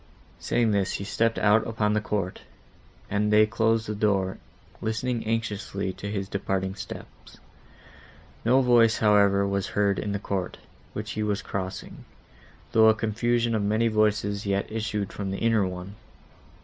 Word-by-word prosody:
Saying 115 -2 +1
this, 100 -2 +1
he - - -3
stepped 115 +3 0
out 105 +1 +3
upon 105 -2 0
the 105 - +1
court, 100 -3 -3 0.7
and 105 +1 0
they 105 0 +6
closed 110 +1 +1
the 105 - -3
door, 100 -3 0 0.4
listening 115 +2 -2
anxiously 105 -3 -2
to 100 - -6
his 100 -2 -3
departing 95 -1 -2
steps. 95 - -10 1.1
No 125 +4 +4
voice, 120 -3 +4
however, 100 -2 +4
was 100 -1 -1
heard 100 -1 +1
in 105 - -3
the 100 - -1
court, 95 -2 -3 0.4
which - - -5
he 110 - -3
was 105 0 -1
crossing, 95 0 -5 0.7
though 110 0 +6
a 110 - +4
confusion 115 +2 0
of 110 - +1
many 110 +3 +2
voices 105 -1 +1
yet 100 +1 -1
issued 105 -2 -3
from 100 -1 -4
the 95 - -3
inner 110 -3 +2
one. 90 +2 -7
105 Hz, 155 wpm, -26 LUFS, 100-110 Hz, 1.1 s, they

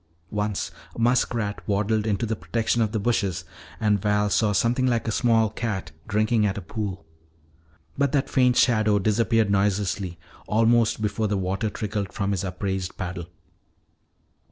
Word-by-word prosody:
Once 105 -1 -2 0.2
a - - -8
muskrat 115 -3 +1
waddled 105 +1 +1
into 105 +2 0
the 110 0 -1
protection 110 +7 -1
of 110 -2 +1
the 110 - -1
bushes. 100 -6 0 0.3
And 105 -3 +2
Val 105 0 +1
saw 105 0 +3
something 120 +5 +2
like 120 -2 0
a - - +1
small 115 -2 +2
cat 100 -7 -3 0.2
drinking 110 +1 +2
at 100 -2 0
a - - -3
pool. 95 -2 -5 0.9
But 140 -2 +2
that 140 -1 +2
faint 125 -2 +3
shadow 110 -4 +4
disappeared 110 +1 +2
noiselessly 100 -2 0 0.3
almost 115 0 +3
before 105 +1 0
the 100 -1 0
water 95 +3 -1
trickled 105 -2 -3
from 100 -1 -1
his 100 -1 -1
upraised 95 0 -3
paddle. 90 -2 -5
105 Hz, 155 wpm, -25 LUFS, 100-115 Hz, 0.9 s, shadow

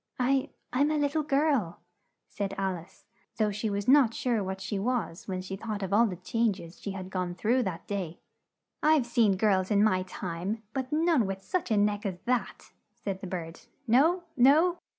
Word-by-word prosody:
"I 265 +1 +2 0.2
I'm 285 +4 +3
a 305 - +1
lit 290 -1 +1
tle 310 +1 +1
girl," 275 - +1 0.5
said 195 -1 -4
Al 190 -1 0
ice, 170 +1 -13 0.3
though 215 -2 +2
she 210 +2 -2
was 200 0 -3
not 260 -4 +5
sure 235 -5 0
what 190 0 -4
she 195 +1 -3
was 225 -4 -2
when 185 -2 -3
she 190 +1 -5
thought 210 0 -4
of 190 0 -3
all 230 +3 +5
the 185 - -4
chang 220 +4 0
es 170 +1 -11
she - - -5
had 190 -1 -7
gone 180 -2 -2
through 235 +7 +2
that 185 -7 -4
day. 185 -5 -4 0.6
"I've 305 -4 +4
seen 230 -5 +3
girls 190 -2 +2
in 205 -1 +4
my 185 -4 +3
time, 185 +3 -4
but 260 -1 -3
none 310 - +3
with 195 0 -5
such 365 - -2
a 215 - +2
neck 205 +1 +1
as 185 -2 -4
that!" 235 -5 -2 0.2
said 195 -2 -5
the 190 - -5
bird. 170 -2 -5 0.3
"No! 305 +10 +4
no! 315 +8 +5
210 Hz, 200 wpm, -29 LUFS, 190-255 Hz, 0.6 s, not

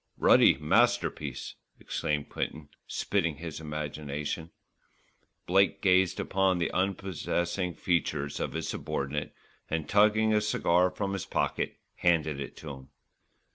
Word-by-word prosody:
"Ruddy - - +6
masterpiece," 90 - +1 0.3
exclaimed 75 -1 -2
Quinton, 75 -2 -4 0.2
spitting 85 -6 0
his 80 0 -7
admiration. 75 +1 -4 1.0
Blake 95 +2 +3
gazed 95 -2 +3
upon 95 -1 +1
the 85 - 0
unprepossessing 90 -2 -1
features 75 -5 -1
of - - -2
his - - -3
subordinate, 70 +2 -3 0.3
and 80 -2 -2
tugging 110 +1 +4
a 105 - +3
cigar 90 -4 +2
from 95 +2 -3
his 95 -3 -4
pocket, - - -1 0.2
handed 80 -4 +2
it 70 - -7
to 75 - -7
him. 65 0 -11
85 Hz, 120 wpm, -29 LUFS, 75-95 Hz, 1.0 s, Ruddy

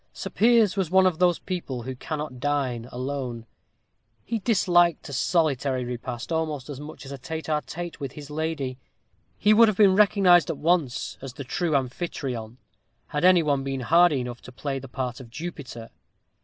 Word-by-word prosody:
Sir - - -6
Piers 225 -3 +4
was 190 -5 -1
one 190 +1 +5
of 180 -3 +1
those 175 -2 +4
people 145 -10 -5
who 130 +2 -5
cannot 150 -1 -5
dine 130 -4 -1
alone. 125 -2 -4 0.8
He 230 -1 -2
disliked 175 -7 +3
a - - -7
solitary 135 -4 +1
repast 120 +2 -5
almost 155 -4 -2
as 140 - -7
much 150 0 -9
as 135 - -9
a 140 - -7
tête 160 +5 -5
à 150 -1 0
tête 175 -2 -7
with 140 -3 -5
his 150 -1 -10
lady. 150 -4 -3 0.6
He 210 - +4
would 230 +1 +7
have 215 -3 0
been 195 -3 +6
recognized 190 -5 +5
at 160 - -2
once 160 -6 0
as 135 -2 -7
the 140 - -7
true 160 +4 -1
Amphitryon, 125 -4 -3 0.5
had 150 +2 -2
any 180 -2 +6
one 140 -3 +1
been 135 -1 -3
hardy 160 +1 +4
enough 120 -1 -6
to - - -12
play 135 +2 -4
the 135 - -10
part 125 -1 -4
of 125 -3 -11
Jupiter. 130 -6 -7
145 Hz, 185 wpm, -25 LUFS, 130-175 Hz, 0.8 s, would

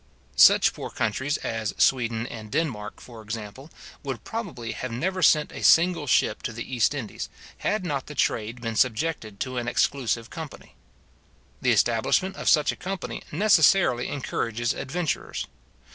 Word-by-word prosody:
Such - - +7
poor - - -6
countries 135 +7 -1
as 110 -2 -3
Sweden 120 -3 +2
and 110 -3 -8
Denmark, 120 -10 -2
for 115 -3 -12
example, 110 +5 -7 0.3
would 130 -6 -5
probably 180 - -5
have 125 +3 -5
never 185 +10 -2
sent 150 -3 +4
a - - -7
single 165 -3 +5
ship - - +2
to 125 - -3
the 120 0 -5
East 120 +4 +2
Indies, 120 -7 -5 0.3
had 210 -3 -1
not 140 -5 -2
the 150 - -8
trade 115 -1 -1
been 115 -1 -3
subjected 115 -3 0
to 130 -1 -3
an 120 -1 -2
exclusive 120 -2 0
company. 160 -4 -9 0.9
The - - +2
establishment 190 +1 +2
of - - 0
such 150 -3 +4
a - - -7
company 190 +1 -5
necessarily 170 - +4
encourages 120 -4 -2
adventurers. 160 +3 -3
130 Hz, 150 wpm, -25 LUFS, 115-160 Hz, 0.9 s, Such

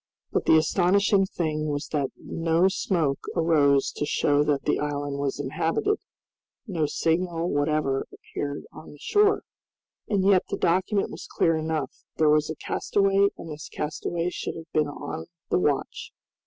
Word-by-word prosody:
But - - 0
the 160 - +7
astonishing 195 +5 +3
thing 155 -4 -2
was 145 0 -3
that 145 -3 0
no 165 +2 +1
smoke 165 -7 0
arose 150 -5 +3
to - - -4
show 145 0 +2
that 145 -2 0
the - - +1
island 145 -1 -2
was 140 -1 -2
inhabited, 165 - 0 0.7
no 170 -9 -1
signal 170 +2 0
whatever 145 -2 0
appeared 145 0 -5
on 155 - -11
the 145 - -15
shore! 415 - +3 0.7
And 195 -3 +1
yet 195 -2 +4
the - - -2
document 190 +4 +1
was - - -8
clear 165 -1 +2
enough; 155 -3 -2 0.3
there 155 -1 +4
was 150 0 +3
a 160 - -3
castaway, 195 +5 +2
and 165 - -8
this 150 0 -8
castaway 165 +3 -2
should - - -4
have 165 0 -10
been 155 -1 +2
on 85 - -6 0.2
the - - +3
watch. 145 -5 -1
160 Hz, 155 wpm, -26 LUFS, 145-180 Hz, 0.7 s, the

